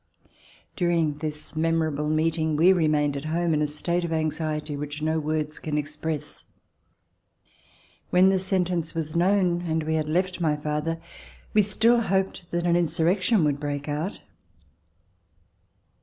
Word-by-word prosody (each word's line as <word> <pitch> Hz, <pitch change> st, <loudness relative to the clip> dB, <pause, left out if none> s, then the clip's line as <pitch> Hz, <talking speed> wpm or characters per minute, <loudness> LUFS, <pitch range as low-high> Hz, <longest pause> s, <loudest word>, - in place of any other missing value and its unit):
During 165 Hz, -5 st, +1 dB
this 150 Hz, 0 st, -5 dB
memorable 155 Hz, -2 st, 0 dB
meeting, 160 Hz, 0 st, +1 dB
we 175 Hz, +5 st, +6 dB
remained 150 Hz, -4 st, +1 dB
at 140 Hz, +2 st, -5 dB
home 165 Hz, +1 st, 0 dB
in 150 Hz, -, +1 dB
a 150 Hz, -, +2 dB
state 170 Hz, +4 st, -1 dB
of 170 Hz, -, -3 dB
anxiety 155 Hz, -1 st, -2 dB
which 145 Hz, +1 st, -5 dB
no 160 Hz, +1 st, +1 dB
words 155 Hz, 0 st, -2 dB
can 150 Hz, -1 st, -3 dB
express. 150 Hz, 0 st, -4 dB, 1.7 s
When 185 Hz, +1 st, +5 dB
the 190 Hz, -1 st, +2 dB
sentence 180 Hz, -3 st, 0 dB
was 155 Hz, -1 st, -3 dB
known 180 Hz, -1 st, +2 dB
and 160 Hz, -2 st, -1 dB
we 160 Hz, +1 st, -1 dB
had 155 Hz, -1 st, -1 dB
left 185 Hz, +2 st, 0 dB
my 155 Hz, -3 st, +2 dB
father, 150 Hz, +2 st, -2 dB, 0.5 s
we 210 Hz, -, +6 dB
still 225 Hz, +4 st, +3 dB
hoped 190 Hz, -3 st, -1 dB
that 175 Hz, 0 st, -2 dB
an 170 Hz, -1 st, +3 dB
insurrection 175 Hz, +4 st, +2 dB
would 145 Hz, -2 st, +1 dB
break 145 Hz, 0 st, -4 dB
out. 150 Hz, +7 st, -3 dB
160 Hz, 140 wpm, -25 LUFS, 150-175 Hz, 1.7 s, we